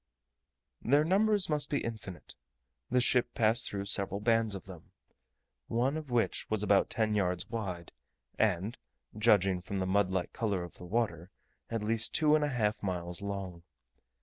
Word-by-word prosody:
Their 145 +5 +3
numbers 200 +3 +3
must 150 -2 -1
be 145 - 0
infinite: 110 -6 -7 0.6
the 125 - +3
ship 125 0 +2
passed 115 +1 +3
through 100 -1 -4
several 100 0 +1
bands 115 -1 +2
of 95 - -8
them, 90 -4 -13 0.7
one 125 +5 0
of 155 -3 -6
which 120 -2 0
was 110 -1 +1
about 100 -1 +3
ten 110 -1 0
yards 90 -3 0
wide, 95 -7 -5 0.5
and, 105 +1 0 0.4
judging 100 -4 +3
from 100 +3 -5
the 95 - -1
mud 95 0 +2
like 95 -1 -2
colour 100 -6 -1
of 85 - -11
the 90 - -9
water, 95 -4 -2 0.4
at 115 -2 -3
least 115 +1 +2
two 150 -1 +4
and 155 -1 +4
a 145 - 0
half 110 -5 -1
miles 90 -2 -3
long. 100 -4 -5
105 Hz, 165 wpm, -31 LUFS, 95-120 Hz, 0.7 s, two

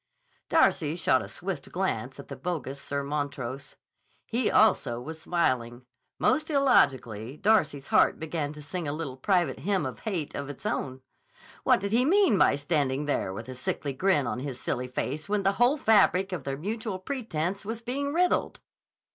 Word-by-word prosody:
Darcy - - +3
shot - - +3
a - - -7
swift - - -5
glance - - -2
at - - -9
the - - -7
bogus 145 -6 -4
Sir 140 0 -3
Montrose. 140 -3 -4 0.5
He 235 0 0
also 190 - +3
was 160 +5 -8
smiling. 125 -8 -1 0.3
Most 310 +1 +1
illogically 135 - +2
Darcy's 155 -11 +2
heart - - +4
began 155 -2 -3
to 150 -1 -10
sing 165 +2 -4
a 145 - -2
little 150 -4 -5
private 175 0 +1
Hymn 190 -3 0
of 130 -3 -5
Hate 180 -9 -3
of 140 0 -5
its 145 - -9
own. 130 - -2 0.6
What - - +4
did 200 +1 -3
he 235 +3 +4
mean 380 - +4
by - - +5
standing 145 -1 0
there 120 -9 -1
with 110 +5 -7
a 130 - -6
sickly 135 +2 -3
grin 165 -1 +2
on 125 - -2
his 130 -2 -5
silly 125 0 -2
face 145 +6 -4
when 205 -1 +1
the 195 - +4
whole 255 +5 +5
fabric 195 -5 +4
of 180 - -4
their 135 0 -3
mutual 215 - -3
pretense 195 - -3
was 225 +2 -5
being 280 +4 -2
riddled? 355 +3 +1
155 Hz, 175 wpm, -28 LUFS, 135-210 Hz, 0.6 s, by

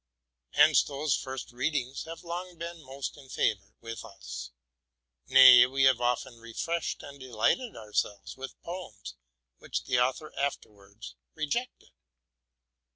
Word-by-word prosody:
Hence - - +6
those 140 -1 -1
first 130 -2 -6
readings 130 +1 -2
have 165 +1 -9
long 175 +1 -5
been 170 0 -7
most 135 0 -6
in 135 -2 -15
favor 100 -5 -1
with 115 -1 -7
us, 60 -8 -8 0.8
—nay, 130 -2 +9
we 135 +1 0
have 130 -2 +5
often 120 -1 -1
refreshed 145 +9 -3
and 140 0 -10
delighted 130 - 0
ourselves 105 -1 -3
with 135 0 -9
poems 115 - -7 0.5
which - - -4
the 125 - +1
author 130 +5 0
afterwards 100 - -5 0.2
rejected. 240 - -3
130 Hz, 125 wpm, -29 LUFS, 115-150 Hz, 0.8 s, nay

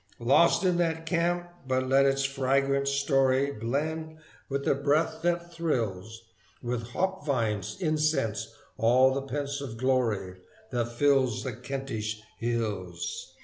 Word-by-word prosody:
Lost 135 +11 +4
is 180 -2 +2
that 165 -2 0
camp, 175 +1 0 0.2
but 130 0 0
let 135 +1 +5
its 135 0 +1
fragrant 135 0 +1
story 140 -1 +2
Blend 155 +7 -3 0.3
with 140 0 -2
the - - +4
breath 145 +3 +1
that 175 0 -1
thrills 115 - -2 0.4
With 120 -1 -3
hopvines' 130 - -1
incense 150 - 0 0.3
all 130 +3 +5
the 140 - -1
pensive 140 -2 -4
glory 115 -7 0 0.3
That 120 -2 -1
fills 130 -2 +2
the 130 - -3
Kentish 110 -4 -4 0.2
hills. 115 - -3
135 Hz, 120 wpm, -28 LUFS, 120-155 Hz, 0.4 s, let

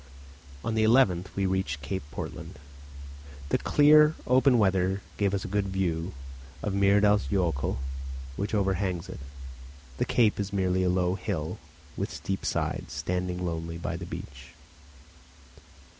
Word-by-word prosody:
On 115 - -1
the 110 0 +2
11th 110 -6 +4
we 100 - 0
reached 95 -7 -1
Cape 95 +7 -3
Portland. 70 - -7 0.9
The - - +2
clear 150 +1 +6
open 130 0 +4
weather 95 -2 +2
gave 100 -2 +2
us 95 -2 -2
a - - -4
good 100 +1 0
view 90 -2 -1 0.5
of 105 - -1
Myrdals 100 +1 +4
jokul, 85 -11 0 0.6
which 100 +5 -2
overhangs 95 -2 0
it. - - -7 0.8
The - - +2
cape 110 -4 +2
is 100 -1 -2
merely 95 -2 +1
a 90 - +2
low 90 0 +2
hill - - -3 0.4
with - - -2
steep 95 0 -3
sides, - - -2
standing 90 0 -2
lonely 85 0 -3
by 85 - -3
the - - -6
beach. 65 +3 -9
95 Hz, 140 wpm, -28 LUFS, 90-105 Hz, 0.9 s, clear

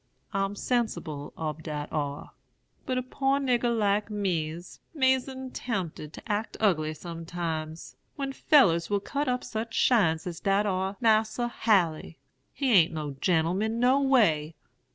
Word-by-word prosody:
I'm 195 +1 -1
sensible 185 - -2
ob 155 -1 -4
dat 150 -2 -4
ar. 145 -2 -3 0.6
But 255 - 0
a 255 - -1
poor 270 +2 0
nigger 245 -3 +1
like 205 0 +1
me's 175 -5 -3 0.2
'mazin' 260 -1 0
tempted 180 -12 -4
to - - -10
act 210 0 -2
ugly 155 -7 +1
sometimes, 165 -1 -5 0.2
when 275 -2 -3
fellers 170 - +4
will 205 -1 +1
cut 280 +8 -3
up 250 0 0
such 225 +1 -5
shines 170 -10 +3
as 175 -3 -5
dat 200 +1 +2
ar 190 0 -1
Mas'r 225 +1 +2
Haley. 175 -9 +1 0.3
He 270 -3 -1
a'n't 160 - -6
no 150 -2 -3
gen'l'man 185 +6 +1
no 255 +3 +4
way. 165 - +3
200 Hz, 140 wpm, -28 LUFS, 165-245 Hz, 0.6 s, fellers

